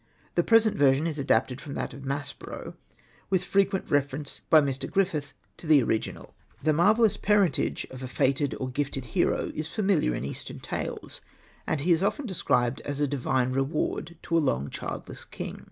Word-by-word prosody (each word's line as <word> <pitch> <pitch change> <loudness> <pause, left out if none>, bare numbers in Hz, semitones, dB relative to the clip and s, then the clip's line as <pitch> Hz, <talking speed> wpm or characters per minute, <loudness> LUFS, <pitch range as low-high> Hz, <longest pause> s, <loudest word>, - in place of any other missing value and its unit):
The - - +3
present 225 -2 +4
version 140 +1 +4
is 155 -3 -2
adapted 130 0 +1
from 140 - -7
that - - -3
of 140 - -9
Maspero, 140 +1 -5 0.6
with 185 -1 +2
frequent 195 +1 +1
reference 140 0 -1
by 160 - +8
Mr. 140 -2 -1
Griffith 160 -7 0 0.2
to 165 - -10
the 150 -4 +6
original. 110 -1 -2 0.3
The 155 0 +3
marvellous 210 +6 +4
parentage 205 -4 +2
of 130 0 -8
a 130 - -4
fated 135 +3 +1
or 130 - -2
gifted 135 -1 -2
hero - - +1
is 155 0 -3
familiar 190 - +1
in 65 - -3
Eastern 70 - -6
tales, - - -5 0.5
and 155 - 0
he 175 +5 +1
is 165 0 +4
often 265 +8 0
described 130 - 0
as 145 0 -4
a 145 - +3
divine 130 -2 0
reward 150 +5 -1
to 165 - -1
a - - +6
long 70 - 0
childJess - - -6
king. - - -6
145 Hz, 175 wpm, -27 LUFS, 135-175 Hz, 0.6 s, by